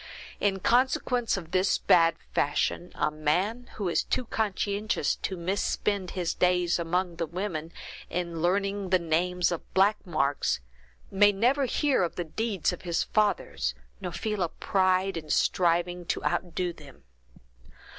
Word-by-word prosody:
In 195 -1 +1
consequence 245 -1 +2
of 170 -3 -8
this 185 +1 +2
bad 165 -1 +4 0.2
fashion, 160 +4 0
a - - 0
man, 185 +11 -1
who 200 - -2
is 170 - +2
too 255 - -1
conscientious 210 -1 -1
to 190 - -4
misspend 190 +1 -1
his 175 -2 0
days 180 -1 +2
among 175 +1 -1
the 165 -1 -2
women, 170 -2 -4 0.4
in 170 -1 -3
learning 195 +2 0
the 185 - +5
names 175 +1 +1
of 170 - -6
black 200 +3 +3
marks, 140 - 0 0.5
may 205 +1 +5
never 250 +8 +2
hear 280 0 +1
of 175 - -1
the 175 - -2
deeds 200 +3 -1
of - - -8
his 175 -2 0
fathers, 200 - 0 0.2
nor 180 - -5
feel 210 +2 -3
a 175 - +1
pride 185 0 +1
in 155 -2 -7
striving 175 +2 +1
to - - -2
outdo 175 0 -1
them. 140 - -15
180 Hz, 145 wpm, -28 LUFS, 170-205 Hz, 0.5 s, the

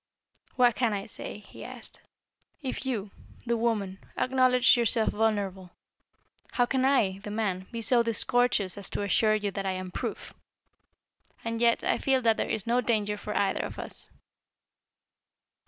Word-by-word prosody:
"What 245 -2 +5
can 230 -1 +1
I 200 -1 -3
say?" - - -7
he 210 - -12
asked. - - -9 0.6
"If 265 0 -4
you, 215 -6 -2 0.3
the 235 0 +1
woman, 210 -5 -1 0.2
acknowledge 255 -1 +4
yourself 235 -1 +2
vulnerable, 200 -4 -1 0.8
how 245 - +3
can 260 +1 +1
I, 210 -9 +2
the 210 - -8
man, 195 -3 -2
be 230 -1 -4
so 240 +1 +5
discourteous 230 -3 +1
as 200 - 0
to - - -3
assure 215 +2 +3
you 205 -1 -1
that 195 0 -3
I 190 - 0
am 185 0 -5
proof? - - -5 1.1
And 230 0 -2
yet, 235 -1 +3
I - - +1
feel 265 -2 +2
that 225 -1 +4
there - - -1
is 215 - -1
no 240 +2 +2
danger 210 -3 0
for 210 0 -4
either 200 - +1
of - - -6
us." - - -4
220 Hz, 160 wpm, -28 LUFS, 200-245 Hz, 1.1 s, What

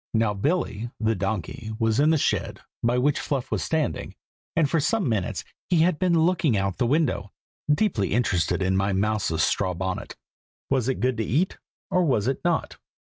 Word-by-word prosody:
Now 110 -2 +2
Billy, 120 - -1
the 110 0 +2
donkey, 110 - -3
was 115 +1 +1
in 150 +2 +5
the 160 - +4
shed, - - -1 0.2
by 120 +1 +2
which 140 +3 +2
Fluff 135 -2 -3
was - - 0
standing, 160 -2 -2 0.4
and 160 -2 +3
for 165 +3 +1
some 195 +5 +1
minutes 105 -6 -1 0.3
he 175 -3 +4
had 170 -1 +2
been 180 -2 +3
looking 170 - +2
out 95 0 0
of - - -30
the 120 - +1
window, 135 -8 +1 0.4
deeply 150 - +1
interested 95 -5 +1
in 95 0 +1
my 95 +1 +1
mouse's 100 -5 +1
straw 95 -3 +1
bonnet. 95 +1 -4 0.6
Was 130 -2 +2
it 130 - -2
good 125 -2 +1
to 110 - 0
eat, 150 - 0 0.3
or 180 - +3
was 125 -10 +1
it 135 +1 -1
not? 175 -2 0
120 Hz, 190 wpm, -25 LUFS, 100-155 Hz, 0.6 s, in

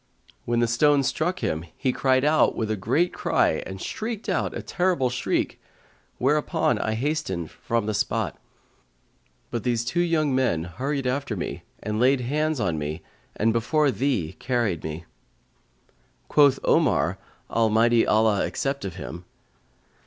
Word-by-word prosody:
When 120 0 +1
the 120 - +3
stone 140 +4 +3
struck 175 +7 -1
him, 80 +1 -1
he 130 - +1
cried 130 0 +2
out 155 +1 +3
with 110 -1 -2
a - - +1
great 130 - +1
cry - - +1
and 95 0 -7
shrieked 220 - -4
out - - -1
a - - -6
terrible 175 -9 +1
shriek, 125 - -1 0.6
whereupon 135 -4 +1
I 110 +1 -1
hastened 110 - -2
from 115 -2 -2
the 110 - -1
spot; 100 - -1 1.1
but 120 - -3
these 120 -2 0
two 145 +8 -1
young 160 -5 +1
men 125 -12 +1
hurried 135 - -3
after 125 -2 -1
me 90 - -4 0.2
and 105 0 -2
laid 130 +2 +4
hands 150 +3 0
on 85 -7 0
me 75 +1 -4 0.3
and 110 +1 +2
before 140 +5 +2
thee 110 - -1
carried 115 - -1
me." 80 +2 -5 1.2
Quoth 145 -3 +5
Omar - - +2 0.3
(Almighty 115 +1 +3
Allah 110 -2 +3
accept 140 0 -2
of 95 -3 -5
him!) 85 -1 -8
120 Hz, 145 wpm, -25 LUFS, 105-145 Hz, 1.2 s, Quoth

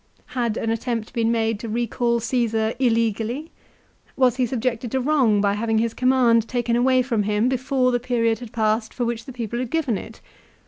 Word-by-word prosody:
Had 235 -3 -1
an 225 - -1
attempt 230 -1 -3
been 230 -1 +1
made 225 -2 0
to 230 - -6
recall 235 +1 0
Caesar 225 -2 0
illegally? 230 +4 0 0.7
Was 255 -2 +3
he 255 -2 +1
subjected 245 0 -2
to 265 - +2
wrong 255 -7 +2
by 200 -1 +2
having 220 +1 0
his 230 0 0
command 245 -3 +3
taken 240 -1 0
away 255 +1 +3
from 235 -4 0
him 210 +3 +1
before 260 0 +1
the 245 - +1
period 230 -2 0
had 240 -3 -9
passed 220 0 0
for 245 - -1
which 235 -1 -3
the 265 - -8
people 235 -1 -4
had 250 -2 -3
given 275 -10 0
it 225 - -11
235 Hz, 190 wpm, -23 LUFS, 225-250 Hz, 0.7 s, Was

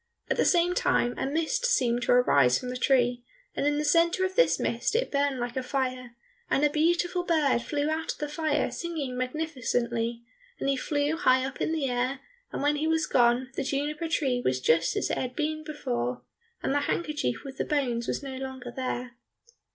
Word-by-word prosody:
At - - +1
the - - +3
same 350 0 +3
time 245 -8 +1
a - - -2
mist 320 - -1
seemed 245 - +2
to - - +1
arise 140 - +5
from 250 - -6
the 250 - -4
tree, 245 -2 +2 0.3
and 285 - 0
in 290 0 +2
the 300 - 0
centre 335 +4 +3
of 375 0 -4
this - - +4
mist - - -1
it - - 0
burned 280 -2 +1
like 240 0 -3
a 260 - 0
fire, 255 -2 -3 0.3
and 290 - +3
a 295 - +2
beautiful 345 +3 +1
bird 305 -8 +2
flew 290 +4 -1
out 315 +1 -1
of - - -18
the 295 - -3
fire 300 0 0
singing 315 -7 -4
magnificently, 245 -4 -2 0.4
and - - -2
he 275 - +3
flew 290 +3 -1
high 260 -6 +3
up 270 - -6
in - - 0
the 315 -4 0
air, 250 +2 -1 0.3
and - - -3
when 295 +1 +2
he 310 +2 0
was 320 -1 +2
gone, 245 +1 +2
the - - -1
juniper 295 +4 -2
tree 270 -7 0
was 130 0 +1
just 160 +5 +2
as - - 0
it - - -1
had 255 -1 -4
been 310 0 -2
before, 125 - -3 0.4
and - - 0
the 290 - +3
handkerchief 295 - -2
with 270 -1 -8
the - - +2
bones 245 -6 -1
was - - -2
no 265 -1 -6
longer 260 -2 -6
there. 250 -2 -4
275 Hz, 205 wpm, -27 LUFS, 245-310 Hz, 0.4 s, arise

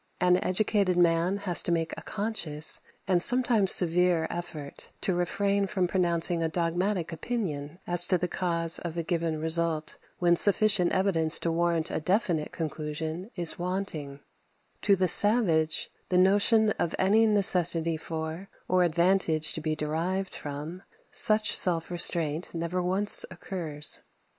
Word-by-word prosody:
An 180 0 +1
educated 195 -1 0
man 170 +2 +1
has 190 -4 +2
to - - -2
make 165 -1 -2
a - - -10
conscious, 195 -8 +2 0.3
and 180 -2 +1
sometimes 235 -4 +4
severe, 175 -1 +2
effort 155 -5 -8
to 190 - -1
refrain 200 +3 -1
from 185 -2 -2
pronouncing 170 -1 0
a 165 - -1
dogmatic 175 +2 -3
opinion 165 -6 -5
as 175 0 +2
to 185 - +2
the 180 +1 -3
cause 170 -2 +1
of 170 -1 -7
a 170 - -2
given 165 -1 -3
result 160 -1 +1 0.2
when 175 -1 +2
sufficient 205 -1 +3
evidence 165 -4 +1
to 170 - -2
warrant 170 -1 -1
a - - -3
definite 175 -3 -2
conclusion 160 +3 -6
is 175 -2 +1
wanting; 175 -6 -6 0.6
to 200 - +3
the 185 -1 -1
savage, 175 -5 +2 0.2
the 180 - 0
notion 205 +4 +3
of 170 - -2
any 215 +4 +2
necessity 175 -5 +4
for, 160 +3 -7 0.2
or 185 0 +1
advantage 170 -2 +1
to 160 - -4
be 155 0 -3
derived 170 +5 -4
from, 150 +5 -8 0.3
such 215 0 +3
self 170 -2 +2
restraint 170 -2 0
never 170 +2 -3
once 190 +3 +4
occurs. 170 -5 -3
175 Hz, 145 wpm, -26 LUFS, 160-190 Hz, 0.6 s, sometimes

